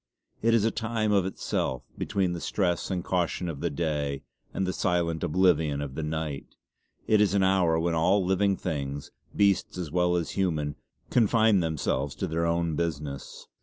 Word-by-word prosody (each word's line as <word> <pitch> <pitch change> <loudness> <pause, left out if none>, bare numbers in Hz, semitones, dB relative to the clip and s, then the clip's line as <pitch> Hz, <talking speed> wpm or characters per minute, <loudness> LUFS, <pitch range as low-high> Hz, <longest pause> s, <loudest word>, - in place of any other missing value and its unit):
It 115 +1 +4
is 110 -2 +3
a 115 - +2
time 110 -1 -1
of 100 -3 +3
itself; 65 -8 -2
between 95 -3 -1
the 85 - -5
stress 90 -4 0
and 90 -3 -2
caution 90 0 -1
of 80 -5 -5
the - - -1
day, 70 -3 -2 0.3
and 95 - -1
the 95 - -1
silent 85 -3 0
oblivion 80 -4 +2
of 70 -2 -4
the 80 - -4
night: 75 -2 -4 0.5
It 110 -1 +4
is 100 -1 +3
an 100 - +3
hour 90 -4 +3
when 85 +1 0
all 90 +4 +3
living 95 +1 +2
things, 70 -4 -4 0.2
beasts 100 -2 +2
as 85 -5 -4
well 90 +1 +2
as 85 -2 -1
human, 75 -7 -1 0.4
confine 110 -3 +4
themselves 75 -4 -1
to - - -2
their 85 0 0
own 85 -1 0
business. 75 -4 -4
85 Hz, 175 wpm, -27 LUFS, 80-95 Hz, 0.5 s, It